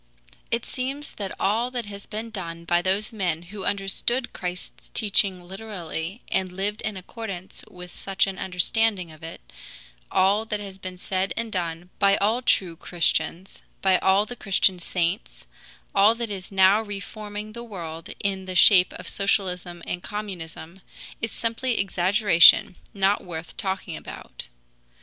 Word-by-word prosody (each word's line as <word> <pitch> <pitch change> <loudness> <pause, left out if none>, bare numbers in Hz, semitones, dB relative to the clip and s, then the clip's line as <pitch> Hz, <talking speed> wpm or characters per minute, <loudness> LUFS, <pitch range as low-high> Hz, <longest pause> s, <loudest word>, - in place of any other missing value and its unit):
It 230 0 -1
seems 270 +3 -4
that 195 -3 -5
all 225 +5 +1
that 245 -3 -3
has 200 -1 -9
been 220 +2 -5
done 170 -5 -6
by 175 0 +3
those 200 +5 +1
men 175 -6 -1
who 195 +2 -8
understood 200 +5 +2
Christ's 180 0 -7
teaching 195 -4 +2
literally 190 -1 -6
and 185 -1 +1
lived 200 +3 -2
in 215 -3 -3
accordance 190 -1 -7
with 180 0 -11
such 195 -1 0
an 195 -1 -5
understanding 190 0 +1
of 155 - -15
it, 165 - -8 0.7
all 195 +3 +3
that 210 -2 -2
has 195 -2 -8
been 185 -1 -7
said 190 +1 -1
and 230 -1 -2
done 175 -2 -3
by 200 -1 +5
all 220 +5 +2
true 185 -8 +2
Christians, 170 +1 0 0.2
by 190 -1 +4
all 195 +2 +4
the 245 - -6
Christian 190 -4 +2
saints, 175 +4 -2 0.5
all 205 +3 +6
that 230 -2 -4
is 190 -1 -5
now 195 +2 +5
reforming 210 0 -6
the 235 - -7
world 165 -7 -7
in 195 -1 -1
the 185 -1 -5
shape 180 0 +7
of - - -9
socialism 180 -3 -1
and 175 - -3
communism 185 -4 -7 0.4
is 230 -2 -2
simply 235 +2 -1
exaggeration, 185 -1 +6 0.2
not 200 0 +2
worth 165 -2 -7
talking 190 -4 -3
about. - - -9
195 Hz, 150 wpm, -25 LUFS, 180-210 Hz, 0.7 s, shape